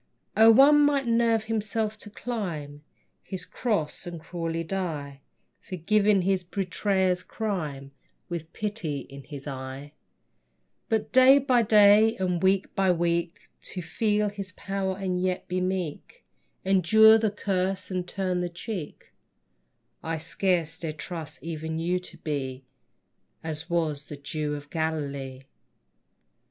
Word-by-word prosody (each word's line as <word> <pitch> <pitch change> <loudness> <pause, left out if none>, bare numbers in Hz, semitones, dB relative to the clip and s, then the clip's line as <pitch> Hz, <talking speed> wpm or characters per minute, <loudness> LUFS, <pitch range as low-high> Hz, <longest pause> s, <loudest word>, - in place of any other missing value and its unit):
O, 220 +1 +7
one 280 +6 +7
might 285 -2 +2
nerve 230 -1 +2
himself 220 0 -1
to 210 - -10
climb 170 -11 -5 0.4
His 185 -2 -6
cross 195 -7 -2
and 170 -1 -6
cruelly 165 0 -4
die, 155 -6 -4 0.4
Forgiving 200 +2 +2
his 190 0 +1
betrayer's 185 0 0
crime, 155 -12 -4 0.4
With 165 -2 -6
pity 200 -10 -3
in 140 +1 -12
his 140 -1 -9
eye; 135 +1 -7 1.0
But 220 -2 0
day 260 +2 +8
by 260 -3 +3
day 215 0 +6
and 180 -2 -1
week 190 0 +2
by 190 -1 +3
week 170 0 -1 0.2
To 180 - -5
feel 210 +5 0
his 200 -3 -7
power 195 0 -3
and 185 -2 -2
yet 185 0 -1
be 185 0 -1
meek, 185 - -4 0.4
Endure 220 +4 +6
the 220 -1 +2
curse 190 -2 -2
and 180 -1 -2
turn 185 -2 -1
the 175 - -2
cheek, 175 -2 -7 0.9
I 165 0 -3
scarce 165 0 0
dare 160 -2 -3
trust 155 0 -7
even 160 -1 -4
you 175 +2 0
to 180 - -11
be 135 -3 -4 0.8
As 160 +1 -5
was 155 -4 -1
the 150 - -8
Jew 150 +1 -3
of 145 0 -10
Galilee. 140 -5 -3
180 Hz, 130 wpm, -27 LUFS, 160-205 Hz, 1.0 s, day